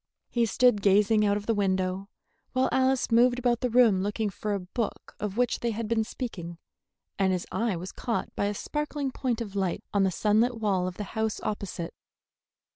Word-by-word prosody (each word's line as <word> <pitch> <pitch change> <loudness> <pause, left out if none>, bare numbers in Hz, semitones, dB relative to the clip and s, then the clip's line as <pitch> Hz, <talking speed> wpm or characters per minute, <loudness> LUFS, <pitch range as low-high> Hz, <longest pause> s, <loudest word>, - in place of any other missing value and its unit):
He 235 -1 +2
stood 245 -2 +3
gazing 210 +2 +4
out 200 0 +2
of 205 - -6
the 230 - +2
window, 190 -1 0 0.4
while 255 +1 +2
Alice 260 -1 +2
moved 245 +2 +5
about 245 -1 +1
the 250 - +1
room 230 -5 +5
looking 210 +1 -1
for 210 +2 -2
a - - -2
book 200 +5 -4
of 210 0 -4
which 245 -1 +1
they 235 - -1
had 225 0 -3
been 225 0 +1
speaking, 190 -8 -6 0.6
and 190 -1 +3
his 180 -2 -1
eye 225 -4 0
was 180 +2 -6
caught 235 - -3
by - - 0
a 205 0 -1
sparkling 295 +2 -3
point 245 -3 -2
of 205 -3 -6
light 190 -3 -1
on 200 - +3
the 190 - +4
sunlit 220 +6 +2
wall 195 -4 +1
of 185 - -6
the 210 - -3
house 220 -1 -1
opposite. 195 -5 -4
210 Hz, 200 wpm, -28 LUFS, 195-240 Hz, 0.6 s, moved